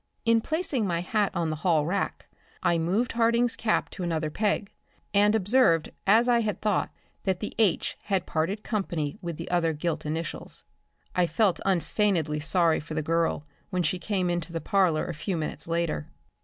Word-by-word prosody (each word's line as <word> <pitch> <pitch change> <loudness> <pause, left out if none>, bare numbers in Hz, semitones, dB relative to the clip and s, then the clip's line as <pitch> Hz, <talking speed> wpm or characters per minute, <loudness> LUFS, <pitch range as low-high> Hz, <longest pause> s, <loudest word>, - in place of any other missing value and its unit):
In 230 0 +4
placing 310 - -1
my 170 -2 0
hat 205 +3 +1
on 165 -2 0
the 155 - -3
hallrack 165 +2 0 0.4
I 170 - +3
moved 195 +9 +1
Harding's 235 +1 +3
cap 220 - 0
to - - -7
another 160 -3 -1
peg 205 +1 0 0.4
and 205 +1 +4
observed, 205 -5 +3 0.2
as 225 +5 +5
I 240 -1 +4
had 215 -2 -1
thought, 210 -2 +1 0.3
that 190 -2 0
the 210 - -4
"H" 205 -6 +2
had 190 -3 0
parted 175 +7 -1
company 175 -6 -2
with 170 -4 -5
the 165 +1 -6
other 165 -2 +2
gilt 160 +2 -2
initials. 160 +1 -3 0.5
I 180 -1 +3
felt 190 +3 +2
unfeignedly 170 -3 +1
sorry 165 +1 +2
for 155 +1 -7
the 155 - -1
girl 165 -1 0 0.2
when 180 -3 0
she 175 +4 0
came 185 -3 0
into 175 -1 -2
the 165 - -2
parlor 175 -1 +2
a 170 - -4
few 175 +4 -3
minutes 155 -1 -4
later. 165 - -1
180 Hz, 175 wpm, -27 LUFS, 165-210 Hz, 0.5 s, as